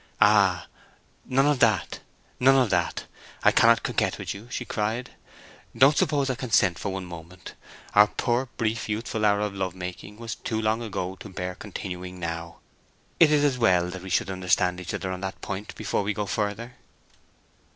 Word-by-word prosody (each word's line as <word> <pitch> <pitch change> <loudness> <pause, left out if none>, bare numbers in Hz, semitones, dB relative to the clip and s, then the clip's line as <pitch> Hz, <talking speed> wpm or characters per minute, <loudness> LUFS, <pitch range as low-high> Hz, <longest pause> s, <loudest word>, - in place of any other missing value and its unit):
"Ah! - - +4 0.6
none 135 +1 +2
of 145 -2 +2
that! 110 -7 +2 0.4
none 135 +2 +6
of 130 -5 +3
that—I 90 -2 -1
cannot 115 0 +5
coquet - - 0
with - - -4
you!" 100 +4 -11
she 125 - -4
cried. 115 +4 -2 0.7
"Don't 135 +5 +6
suppose 140 -2 +1
I 130 - 0
consent 110 - +2
to - - -10
for 100 - -2
one 95 -1 -4
moment. 85 +1 -10 0.4
Our 105 +1 +7
poor, 120 +4 -1
brief, 115 0 -1
youthful 110 0 -2
hour 100 -1 +3
of 105 -1 -2
love 95 -2 -3
making 90 +3 -7
was 115 -1 -5
too 110 -2 -3
long 110 +1 0
ago 95 -4 -4
to 105 - -10
bear 90 -1 -4
continuing 90 -2 -7
now. 85 0 -5 0.6
It 160 -3 +7
is 150 -1 +4
as 135 -3 +1
well 90 -6 +3
that 95 0 -7
we 95 - -8
should 95 +2 +1
understand 90 0 +1
each 90 - -4
other 95 - -3
on 90 0 -5
that 95 -1 -5
point 100 +2 -6
before 105 -1 -1
we 100 0 -2
go 105 - -2
further." 105 +4 -3
105 Hz, 185 wpm, -26 LUFS, 90-115 Hz, 0.7 s, Our